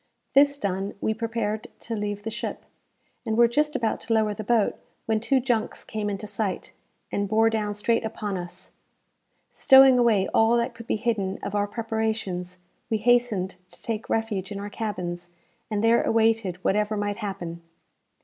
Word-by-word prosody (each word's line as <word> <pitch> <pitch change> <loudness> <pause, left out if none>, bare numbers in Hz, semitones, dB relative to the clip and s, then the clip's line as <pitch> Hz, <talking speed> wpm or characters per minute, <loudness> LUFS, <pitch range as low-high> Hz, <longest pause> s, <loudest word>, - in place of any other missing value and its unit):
This 280 +1 +5
done, 195 -5 -2
we 220 - 0
prepared 220 -1 -3
to 230 - -4
leave 205 -1 -3
the 225 - -4
ship, 235 - -5 0.6
and 220 -2 -1
were 235 0 +7
just 300 +5 0
about 225 -2 0
to 225 - -2
lower 215 -1 +2
the 215 - -6
boat, 220 -1 +1 0.3
when 220 -1 +1
two 265 +4 +2
junks 240 -3 -1
came 215 -1 -3
into 200 +1 -4
sight, 205 -2 -3 0.4
and 200 0 -1
bore 225 +1 +4
down 210 -2 -1
straight 230 +3 +1
upon 210 -2 -3
us. 175 0 -7 0.8
Stowing 265 -1 +7
away 220 -5 +3
all 225 +2 +4
that 235 0 -1
could 230 0 -11
be - - +1
hidden 210 -4 -1
of 200 - -4
our 205 0 +1
preparations, 220 -5 -3 0.3
we 220 - +1
hastened 215 -5 +2
to - - -15
take 225 -1 -4
refuge 210 -4 -1
in 200 - -4
our 205 +1 -6
cabins, 175 -6 -4 0.4
and 210 -1 -1
there 230 +1 +5
awaited 225 -4 +2
whatever 210 +1 +1
might 205 0 -2
happen. 175 -5 -5
220 Hz, 170 wpm, -25 LUFS, 200-230 Hz, 0.8 s, were